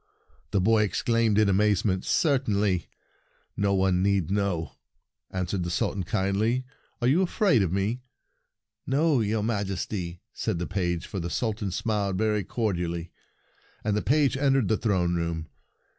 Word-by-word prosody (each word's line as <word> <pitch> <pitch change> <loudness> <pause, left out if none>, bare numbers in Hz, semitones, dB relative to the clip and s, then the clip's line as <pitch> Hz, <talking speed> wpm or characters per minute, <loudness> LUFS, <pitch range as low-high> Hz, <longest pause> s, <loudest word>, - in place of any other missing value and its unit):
the 100 - +1
boy 110 +3 +4
exclaimed 110 +2 +1
in 110 -1 +4
amazement. 100 -1 +2
"Certainly. 105 - +1 0.7
No 100 -1 +1
one 95 -1 +2
need 95 -3 +1
know," 100 -5 -1 0.6
answered 95 0 -2
the 85 - -2
Sultan 95 +2 -1
kindly. 110 +6 0 0.4
"Are - - +4
you 150 +8 +4
afraid 185 - +3
of 90 -4 0
me?" 100 +6 -1 0.4
" - - -53
No, 155 -3 +3
your 110 -1 0
Majesty," 95 -4 -3
said 110 -6 -2
the 90 - -2
page, 85 -3 -2
for 95 - -5
the 85 0 -3
Sultan 105 -1 -2
smiled 100 -1 -1
very 105 0 +1
cordially; 90 -5 -2 0.7
and 105 -1 0
the 105 - +1
page 145 0 +2
entered 135 -4 +2
the 110 - +2
throne 95 -6 +1
room. 85 -2 -2
100 Hz, 145 wpm, -27 LUFS, 90-115 Hz, 0.7 s, boy